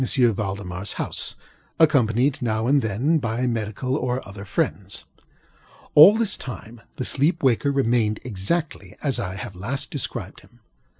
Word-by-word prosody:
ValdemarŌĆÖs 100 Hz, -7 st, -1 dB
house, -, -, -3 dB, 0.4 s
accompanied, 135 Hz, -4 st, +3 dB
now 110 Hz, -2 st, 0 dB
and 140 Hz, +3 st, +3 dB
then, 125 Hz, +10 st, +1 dB
by 120 Hz, 0 st, -1 dB
medical 120 Hz, +4 st, -2 dB
and 125 Hz, +1 st, 0 dB
other 100 Hz, -1 st, -10 dB
friends. 95 Hz, -, -2 dB, 0.9 s
All 185 Hz, +9 st, +9 dB
this 220 Hz, -3 st, +1 dB
time 120 Hz, -2 st, -9 dB
the 130 Hz, -, -4 dB
sleeper 150 Hz, +4 st, +1 dB
waker 130 Hz, +3 st, +3 dB
remained 115 Hz, -5 st, +1 dB
exactly 105 Hz, -, -2 dB
as 140 Hz, -4 st, 0 dB
I 95 Hz, -1 st, -3 dB
have 95 Hz, 0 st, -7 dB
last 120 Hz, +10 st, -4 dB
described 120 Hz, -, -4 dB
him. 120 Hz, -1 st, -23 dB
120 Hz, 135 wpm, -23 LUFS, 105-140 Hz, 0.9 s, All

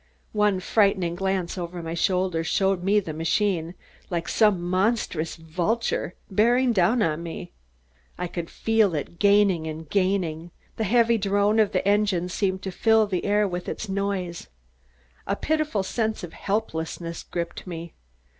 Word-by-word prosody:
One 210 Hz, -3 st, +2 dB
frightened 190 Hz, -3 st, +2 dB
glance 190 Hz, -2 st, -1 dB
over 175 Hz, 0 st, -5 dB
my 165 Hz, 0 st, -4 dB
shoulder 180 Hz, -1 st, +1 dB
showed 190 Hz, +2 st, +1 dB
the 195 Hz, -4 st, +1 dB
machine, 165 Hz, +1 st, 0 dB, 0.3 s
like 170 Hz, -2 st, -2 dB
some 210 Hz, -4 st, +3 dB
monstrous 185 Hz, -2 st, 0 dB
vulture, 175 Hz, +5 st, -2 dB, 0.2 s
bearing 240 Hz, +5 st, +3 dB
down 215 Hz, +4 st, +3 dB
on 155 Hz, -2 st, 0 dB
me. 170 Hz, -1 st, -7 dB, 0.7 s
I -, -, -2 dB
could 170 Hz, -1 st, -5 dB
feel 220 Hz, -6 st, +2 dB
it 155 Hz, +3 st, -5 dB
gaining 200 Hz, -5 st, +4 dB
and 160 Hz, 0 st, -6 dB
gaining. 180 Hz, -3 st, 0 dB, 0.3 s
The 220 Hz, -, 0 dB
heavy 230 Hz, +2 st, +3 dB
drone 205 Hz, +2 st, +2 dB
of 215 Hz, -2 st, +3 dB
the 185 Hz, +1 st, 0 dB
engines 200 Hz, -4 st, +1 dB
seemed 190 Hz, -2 st, -1 dB
to 190 Hz, -, -3 dB
fill 220 Hz, +3 st, +4 dB
the 185 Hz, -4 st, -2 dB
air 205 Hz, 0 st, +3 dB
with 180 Hz, -1 st, -4 dB
its 220 Hz, -, -5 dB
noise. 195 Hz, -3 st, -3 dB, 0.8 s
A 200 Hz, -, +1 dB
pitiful 305 Hz, -7 st, 0 dB
sense 220 Hz, +1 st, -2 dB
of 170 Hz, -, -7 dB
helplessness 170 Hz, -5 st, -3 dB
gripped 170 Hz, +1 st, -5 dB
me. 170 Hz, -1 st, -7 dB
190 Hz, 145 wpm, -25 LUFS, 170-210 Hz, 0.8 s, gaining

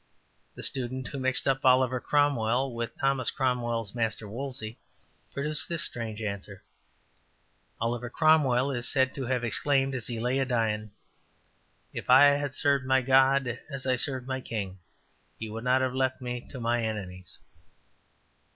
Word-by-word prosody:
'' -, -, -41 dB
The -, -, -8 dB
student 130 Hz, 0 st, -1 dB
who 140 Hz, -, -5 dB
mixed 130 Hz, +1 st, +1 dB
up 135 Hz, 0 st, +1 dB
Oliver 130 Hz, -1 st, +4 dB
Cromwell 130 Hz, -3 st, +1 dB
with 115 Hz, -1 st, -4 dB
Thomas 135 Hz, -1 st, +1 dB
Cromwell's 120 Hz, -5 st, -1 dB
master 115 Hz, -2 st, -2 dB
Wolsey 120 Hz, -1 st, -5 dB, 0.5 s
produced 150 Hz, +2 st, -1 dB
this 170 Hz, -2 st, -1 dB
strange 115 Hz, -2 st, -4 dB
answer: 100 Hz, -1 st, -6 dB, 1.2 s
``Oliver 120 Hz, +1 st, -2 dB
Cromwell 140 Hz, -5 st, +3 dB
is 120 Hz, -2 st, -3 dB
said 130 Hz, -1 st, +2 dB
to 135 Hz, -3 st, -4 dB
have 125 Hz, -1 st, 0 dB
exclaimed, 135 Hz, +3 st, +1 dB
as 120 Hz, -4 st, -4 dB
he 120 Hz, -2 st, -3 dB
lay 125 Hz, +3 st, 0 dB
a 135 Hz, -, +1 dB
dying, 110 Hz, -4 st, -1 dB, 1.0 s
If -, -, -6 dB
I 130 Hz, +3 st, +9 dB, 0.2 s
had 145 Hz, -2 st, -3 dB
served 140 Hz, -3 st, +1 dB
my 130 Hz, 0 st, +3 dB
God 130 Hz, -1 st, +3 dB
as 135 Hz, -3 st, -5 dB
I 130 Hz, -1 st, +2 dB
served 130 Hz, -1 st, -3 dB
my 130 Hz, 0 st, -3 dB
king, 100 Hz, -6 st, -5 dB, 0.6 s
He 110 Hz, -1 st, -6 dB
would 115 Hz, +1 st, -6 dB
not 130 Hz, +1 st, +3 dB
have 130 Hz, -1 st, 0 dB
left 130 Hz, 0 st, 0 dB
me 125 Hz, -1 st, -5 dB
to 130 Hz, -, -8 dB
mine 120 Hz, 0 st, 0 dB
enemies.'' 95 Hz, -4 st, -5 dB
125 Hz, 160 wpm, -28 LUFS, 115-135 Hz, 1.2 s, I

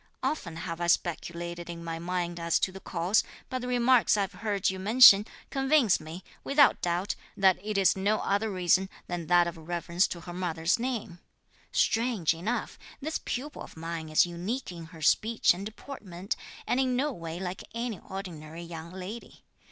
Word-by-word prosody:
Often 175 Hz, -, -2 dB
have 165 Hz, 0 st, -5 dB
I 175 Hz, -, 0 dB
speculated 175 Hz, 0 st, -1 dB
in 170 Hz, -1 st, -6 dB
my 165 Hz, -1 st, -4 dB
mind 175 Hz, 0 st, -2 dB
(as 170 Hz, 0 st, +2 dB
to 190 Hz, -, +1 dB
the 190 Hz, -, -9 dB
cause), 185 Hz, +3 st, +1 dB, 0.3 s
but 255 Hz, -, -2 dB
the 250 Hz, -, -5 dB
remarks 245 Hz, -2 st, +4 dB
I've 200 Hz, -1 st, 0 dB
heard 205 Hz, -3 st, 0 dB
you 190 Hz, -, -6 dB
mention, 210 Hz, 0 st, +8 dB, 0.2 s
convince 270 Hz, -, +3 dB
me, 160 Hz, +4 st, -9 dB, 0.2 s
without 280 Hz, -1 st, +4 dB
doubt, 175 Hz, +3 st, 0 dB, 0.2 s
that 190 Hz, -2 st, +4 dB
it 210 Hz, -1 st, -2 dB
is 195 Hz, -2 st, +4 dB
no 200 Hz, +3 st, +1 dB
other 205 Hz, +3 st, 0 dB
reason 185 Hz, 0 st, +2 dB, 0.2 s
(than 175 Hz, -2 st, -4 dB
that 175 Hz, -1 st, +5 dB
of 170 Hz, -, -4 dB
reverence 170 Hz, +2 st, 0 dB
to 170 Hz, -, -6 dB
her 175 Hz, -, -8 dB
mother's 175 Hz, +1 st, 0 dB
name). 230 Hz, -8 st, -3 dB, 0.5 s
Strange 225 Hz, -8 st, +2 dB
enough, 200 Hz, +9 st, -3 dB, 0.2 s
this 310 Hz, +3 st, -3 dB
pupil 285 Hz, +4 st, -4 dB
of -, -, -10 dB
mine 165 Hz, -1 st, -5 dB
is 155 Hz, -, +5 dB
unique 185 Hz, +8 st, -4 dB
in 170 Hz, -2 st, -8 dB
her 160 Hz, -1 st, -11 dB
speech 220 Hz, +6 st, +4 dB
and 195 Hz, +3 st, -5 dB
deportment, 205 Hz, -6 st, -6 dB, 0.3 s
and 250 Hz, -, +1 dB
in 255 Hz, -1 st, +2 dB
no 285 Hz, +4 st, +1 dB
way 165 Hz, -6 st, -6 dB
like 185 Hz, 0 st, -5 dB
any 230 Hz, -4 st, -3 dB
ordinary 170 Hz, -4 st, -8 dB
young 165 Hz, -1 st, -8 dB
lady. 190 Hz, +5 st, -9 dB
185 Hz, 175 wpm, -29 LUFS, 170-220 Hz, 0.5 s, mention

